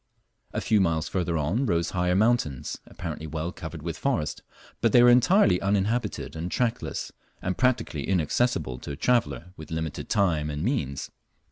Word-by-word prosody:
A - - -2
few 105 -2 +3
miles 80 -3 +1
further 85 -3 -1
on 90 - 0
rose 85 -3 +1
higher 90 0 +1
mountains, 105 - +1
apparently 80 - -6
well 80 +3 -3
covered 80 -2 -8
with 85 -1 -4
forest, 85 - -1 0.4
but - - +2
they 120 - +8
were 120 - +8
entirely 125 - +5
uninhabited 105 +2 0
and 80 +2 -3
trackless, 120 +3 -2 0.3
and 95 0 -2
practically 120 - 0
inaccessible 85 - +1
to 70 - -6
a - - -5
traveller 90 - 0
with 80 - -10
limited 80 -1 -4
time 80 -7 +2
and 75 +1 -3
means. 75 - -2
90 Hz, 160 wpm, -26 LUFS, 80-115 Hz, 0.4 s, they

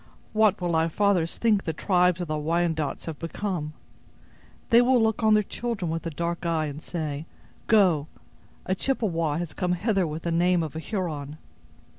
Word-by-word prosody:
What 215 -2 +3
will 175 -2 -1
our 160 +1 +2
fathers 185 -2 +1
think 215 -4 +2
the 160 - -2
tribes 180 +1 +2
of 175 - -3
the 155 0 -2
Wyandots 160 -1 -1
have 160 -3 -6
become? 165 -3 -3 1.0
They 235 +1 +8
will 250 0 +4
look 220 0 +1
on 215 -1 +5
their 210 - +3
children 205 -6 -3
with 165 +1 -3
a - - -1
dark 170 +3 -3
eye, 165 -2 0
and 150 0 -6
say, 155 -2 -4 0.4
'Go! 180 -9 +4 0.6
a 185 - 0
Chippewa 175 - 0
has 170 -2 -4
come 180 -1 0
hither 195 -1 +1
with 155 +1 -5
the 170 - -1
name 175 +1 +3
of 155 -1 -6
a - - -3
Huron. 155 -6 -4
170 Hz, 180 wpm, -26 LUFS, 160-200 Hz, 1.0 s, They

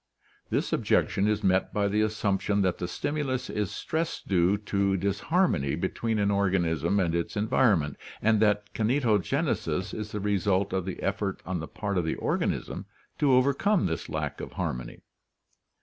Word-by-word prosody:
This - - -1
objection 100 +2 +2
is 105 0 0
met 95 0 +2
by 100 -1 +1
the 105 +2 +1
assumption 105 -1 +1
that 95 -2 0
the 90 - -2
stimulus 135 +5 -2
is 105 -3 -1
stress 160 +1 -2
due 95 +1 +2
to 100 -1 0
disharmony 100 - +1
'be 95 +3 -1
tween 115 -2 -2
an 100 -1 +2
organism 90 -2 +1
and 85 -4 +1
its 85 +4 -2
environment, 105 - +2 0.2
and 110 0 +3
that 105 -1 +1
kinetogenesis 110 -3 0
is 105 -1 -5
the 105 - -3
result 100 -1 +1
of 95 -2 -1
the 95 - -5
effort 100 0 -1
on 90 -1 -2
the 80 - -5
part 100 -3 -2
of - - 0
the 80 - -1
organism - - -2 0.3
to 140 -3 +4
overcome 140 - +3
this 80 -3 -3
lack - - -3
of - - -7
harmony. - - -4
100 Hz, 165 wpm, -28 LUFS, 95-110 Hz, 0.3 s, to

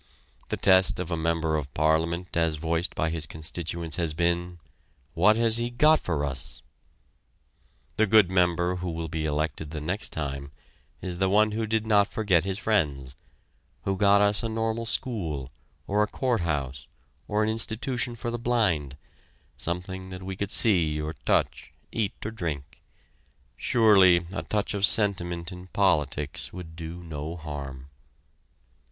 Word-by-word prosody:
The - - -2
test 95 -2 +4
of 90 -1 -4
a - - +1
member 80 -1 0
of 70 -3 -3
Parliament 80 +3 +1
as 80 -2 +2
voiced 85 +3 -2
by 80 +1 0
his 80 -3 -3
constituents 80 0 -4
has 80 -3 -1
been: 85 +1 0 0.6
"What 105 +6 +4
has 115 0 +4
he 120 0 0
got 150 +6 +4
for 75 -4 -2
us?" 75 +4 -4 1.3
The 110 - +3
good 100 -3 +5
member 90 0 +2
who 90 0 -4
will 80 -1 -4
be 80 0 -3
elected 75 0 -2
the 75 0 -5
next 90 +8 -3
time 70 -2 -5 0.5
is 90 -1 -4
the 95 -1 +2
one 105 +2 +4
who 110 +1 -2
did 110 0 0
not 105 -2 +3
forget 95 -6 +2
his 95 -1 -2
friends, 70 -12 0 0.7
who 95 - 0
got 100 +1 +5
us 105 0 +4
a 115 - -2
Normal 115 +1 -2
School, 80 - -2 0.3
or 105 +2 +1
a 105 - +2
Court 125 +1 -1
House, 70 -5 -3 0.4
or 105 0 +1
an 110 - +1
Institution 120 +2 -1
for 120 +1 -4
the 120 - -3
Blind, 95 - 0 0.6
something 95 +2 -3
that 90 0 -8
we 95 0 -5
could 100 +1 -3
see 85 -10 +4
or 75 +1 -3
touch, - - -1 0.2
eat 110 -4 -1
or 105 - -3
drink. 75 -8 -5 0.7
Surely 95 -7 +5
a - - -2
touch 105 0 -2
of 100 -1 -3
sentiment 90 -5 +2
in 90 0 -10
politics 75 -7 0
would 85 -3 -9
do 85 +1 -7
no 80 0 -6
harm. 70 -4 -7
90 Hz, 160 wpm, -26 LUFS, 80-105 Hz, 1.3 s, good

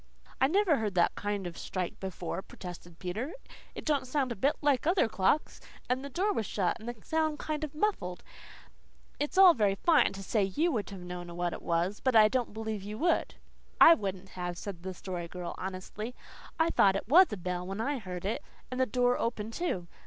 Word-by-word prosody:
"I 265 - +6
never 360 -1 +3
heard 210 -4 -2
that 175 - +3
kind 205 -2 -3
of 175 -1 -5
a - - -9
strike 180 -2 -4
before," 185 -1 -4
protested 175 -3 -10
Peter. 215 - -4 0.4
"It - - -7
don't 285 -4 +1
sound 260 -1 0
a - - -2
bit 275 +9 +2
like 290 -1 +2
other 355 - +4
clocks. 220 +8 +1 0.3
And 255 +2 0
the 280 - -6
door 390 +9 0
was 220 - -2
shut 190 0 0
and 230 +2 -6
the 240 - -5
sound 315 -1 0
kind 310 0 -3
o' 305 - -2
muffled. 300 - -2 1.0
It's 295 +5 -2
all 380 -2 +9
very 205 -6 +2
fine 300 - +4
to 195 0 -7
say 215 +2 +1
you 300 - +1
would 220 -7 -2
have 195 -2 -8
known 175 -1 -7
what 175 -1 -1
it - - -7
was, 175 +4 0
but 260 -3 +1
I 215 -1 +8
don't 250 -1 -1
believe 220 -1 -4
you 210 +2 -6
would." 335 +4 +1 0.4
"I 330 - +10
wouldn't 195 - -4
have," 175 -1 -5
said 190 -3 -6
the 185 0 -6
Story 175 -2 -5
Girl 180 0 -6
honestly. 190 +5 -5 0.4
"I 325 +1 +3
thought 195 -1 +4
it 195 - -3
WAS 350 +6 +7
a 210 - -3
bell 180 0 -3
when 195 +2 -4
I 275 +4 -1
heard 185 -3 -6
it, 210 - -1 0.3
and 255 - -3
the 260 - +3
door 245 +2 +2
open, 225 -2 -2
too. 225 - -2
215 Hz, 215 wpm, -30 LUFS, 185-280 Hz, 1.0 s, I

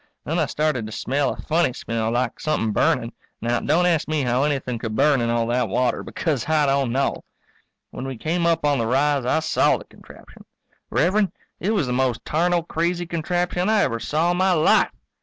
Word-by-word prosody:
Then 165 +3 -1
I 155 - +1
started 150 -8 -1
to - - -9
smell 135 +5 -1
a - - -5
funny 160 -4 +1
smell, 115 -2 -3
like 120 +2 -1
somethin' 150 -8 0
burning. 115 +3 +1 0.3
Now, 120 +1 0
don't 175 +2 +2
ask 170 -4 +1
me 155 -2 0
how 125 +1 +1
anything 135 -5 -1
could 110 -1 -4
burn 140 +3 +3
in 115 - 0
all 115 0 +1
that 120 -1 0
water, 125 +4 0
because 155 -4 -3
I 155 -2 +3
don't 135 -3 +1
know. 135 +3 -1 0.7
When 130 - -6
we 135 -2 -5
came 170 +7 0
up 165 -2 +1
on 145 -3 +2
the 115 - 0
rise 140 +1 +1
I 155 +5 +1
saw 160 - +2
the - - -11
contraption. - - -16 0.5
Rev'rend, 195 +4 +1 0.3
it 210 +5 0
was 185 -8 +1
the 125 - -2
most 125 -2 0
tarnal 175 +2 +1
crazy 170 +2 -1
contraption 175 +3 -1
I 220 -2 +3
ever 115 - -1
saw 160 +8 0
in 175 - -1
my 185 0 +3
life. 155 -3 +4
145 Hz, 205 wpm, -22 LUFS, 125-170 Hz, 0.7 s, life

